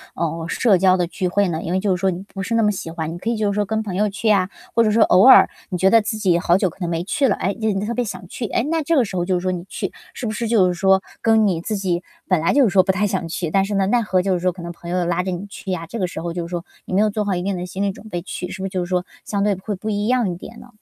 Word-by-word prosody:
嗯， 165 0 -2
社 210 -7 +3
交 185 0 +4
的 175 -1 0
聚 185 +1 -2
会 200 +2 +2
呢？ 165 -1 -2
因 170 - -3
为 190 - +2
就 190 -2 +1
是 - - -5
说 190 -1 +2
你 180 +2 -5
不 195 - -4
是 230 +3 -3
那 230 - +3
么 210 - +3
喜 165 -4 -6
欢， 160 -1 -4
你 - - -6
可 220 +6 -3
以 - - 0
就 210 -2 +1
是 200 - -3
说 205 -1 +1
跟 220 +2 -1
朋 195 -4 -5
友 210 +2 +2
去 210 +2 -1
啊。 190 -2 +2 0.2
或 230 - +4
者 215 - +2
说 220 +2 +3
偶 185 +2 +5
尔， 265 - +8 0.2
你 180 - -2
觉 190 +2 +4
得 225 +1 +6
自 220 +1 -3
己 185 -5 +2
好 175 +1 +3
久 190 -2 +1
可 170 - -17
能 175 - -1
没 165 0 -1
去 270 +8 +1
了， - - +2
诶， 195 - 0
今 225 - -14
天 210 -3 +1
你 - - -2
特 235 - -2
别 245 - 0
想 185 -4 -7
去， 230 - -5
诶， 230 - 0
那 325 0 +1
这 330 +3 +1
个 265 - +4
时 200 - -7
候 175 -1 0
就 185 -1 +1
说 185 +1 -1
你 175 -1 -4
去， - - -4 0.2
是 250 - -6
不 - - -1
是 230 +2 -3
就 215 -5 +4
是 180 - 0
说， 190 +2 +3 0.2
跟 220 -1 +4
你 170 -4 0
自 215 +4 -3
己 180 -2 -1 0.2
本 185 -3 +2
来 165 - +2
就 285 - +5
是 230 - +4
说 190 0 +4
不 190 - +2
太 205 +2 0
想 190 -4 -2
去， 165 0 -3
但 195 +4 +2
是 205 - -4
呢， 195 -1 +2
奈 240 +4 +3
何 190 -4 +1
就 190 +1 0
是 180 - 0
说 180 +1 +1
可 175 0 -11
能 170 - -6
朋 170 0 -10
友 180 -1 0
拉 175 +1 0
着 185 - -2
你 180 +2 -4
去 195 -1 -7
呀， 170 -2 -3
这 230 - -6
个 185 - +1
时 165 - -6
候 170 0 -4
就 175 -1 -3
是 - - -13
说 175 -1 -3 0.2
你 - - -7
没 195 - +4
有 215 - +3
做 210 +1 -1
好 200 - 0
一 175 - -2
定 195 +1 -1
的 180 - -4
心 190 +2 -6
理 200 - +1
准 210 - -13
备 175 -2 -3
去， 180 0 -6
是 190 0 -7
不 - - -2
是 - - -6
就 185 -1 -2
是 175 - -7
说， 180 -1 0 0.2
相 200 -1 -1
对 205 -1 +2
会 200 +3 -5
不 205 +4 -5
一 205 0 -1
样 245 -4 +2
一 - - -4
点 175 - -11
呢？ - - -13
190 Hz, 390 characters per minute, -21 LUFS, 180-210 Hz, 0.2 s, 尔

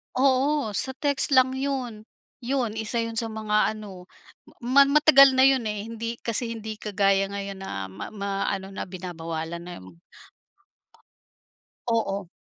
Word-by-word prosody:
Oo, 270 0 +2
sa 265 - 0
text 285 +1 0
lang 260 0 +4
yun. 255 -6 -3 0.3
Yun, 245 -3 -2
isa 225 +2 -1
yun 230 0 -5
sa 230 - +1
mga 215 0 +1
ano, 200 -4 -10 0.6
ma 260 +4 +5
matagal 275 -1 +7
na 260 - +3
yun 265 -4 +2
eh, 210 0 -4
hindi 230 0 -5
kasi 230 0 -1
hindi 220 -1 -7
kagaya 195 -2 +1
ngayon 200 -1 -5
na 100 - -5
ma 95 +2 -8
maano 195 -1 -3
na 195 - -6
binabawalan 170 -2 -6
na 175 0 -9
yung 90 -2 -15 1.9
Oo. 200 -5 -1
220 Hz, 140 wpm, -25 LUFS, 195-260 Hz, 1.9 s, matagal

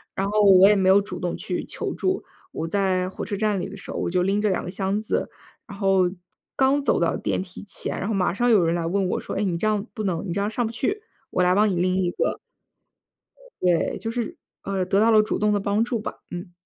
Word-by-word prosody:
然 195 - -1
后 210 0 +2
我 195 -1 +8
也 210 - +5
没 190 -1 +2
有 200 +1 +6
主 180 -3 -7
动 175 -1 -2
去 - - -4
求 - - -4
助， 375 0 -1 0.3
我 165 - -3
在 185 -1 0
火 - - -6
车 205 - -3
站 210 -1 0
里 - - -3
的 200 - -9
时 195 - -8
候， - - -5
我 - - -1
就 180 0 +1
拎 200 +2 +1
着 210 - +2
2 185 - -1
个 180 - -5
箱 195 +1 -1
子， 215 - -2 0.4
然 200 -3 -9
后， 195 -2 +3 0.5
刚 275 +2 +3
走 - - +2
到 - - +1
电 - - -1
梯 180 -1 -11
前， - - -4
然 195 - -3
后 225 - -1
马 185 -3 +1
上 240 +4 +1
有 205 -6 +5
人 165 0 +1
来 170 -1 -1
问 190 +3 0
我 - - -1
说， - - -6
哎， 205 - 0
你 175 -4 0
这 215 - 0
样 210 -1 0
不 215 -3 -4
能， 175 -1 -1
你 175 - -4
这 200 - -1
样 205 +1 0
上 235 +2 -1
不 225 - -3
去， 405 - -2 0.3
我 180 - +1
来 180 0 +4
帮 210 +2 +4
你 185 - -1
拎 185 +1 +1
一 175 - +1
个。 - - -1 1.2
对， 175 -2 +1
就 225 - -4
是， 230 -1 -3 0.3
呃， 195 -1 -1
得 195 +2 +2
到 225 +1 +4
了 215 -1 +7
主 215 - -2
动 210 0 +2
的 205 - +1
帮 205 +3 +1
助 235 -1 -2
吧， - - -6
嗯。 175 0 -6
195 Hz, 280 characters per minute, -24 LUFS, 185-215 Hz, 1.2 s, 我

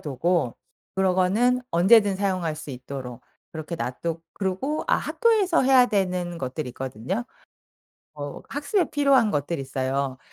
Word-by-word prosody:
두고 150 -1 0 0.4
그런 190 -1 +2
거는 225 +8 +2
언제든 195 +3 +5
사용할 185 -5 -1
수 150 - -8
있도록 130 -1 -7 0.3
그렇게 160 +1 -5
놔두 160 +6 -3
그리고 200 +11 -2
아 - - +4
학교에서 420 - +2
해야 255 -1 +6
되는 180 -5 -1
것들이 130 -1 -4
있거든요. 130 - -4 0.9
어 145 -1 -7
학습에 295 +5 0
필요한 275 -6 +4
것들이 145 +2 -1
있어요. 135 0 -2
180 Hz, 310 characters per minute, -25 LUFS, 140-235 Hz, 0.9 s, 해야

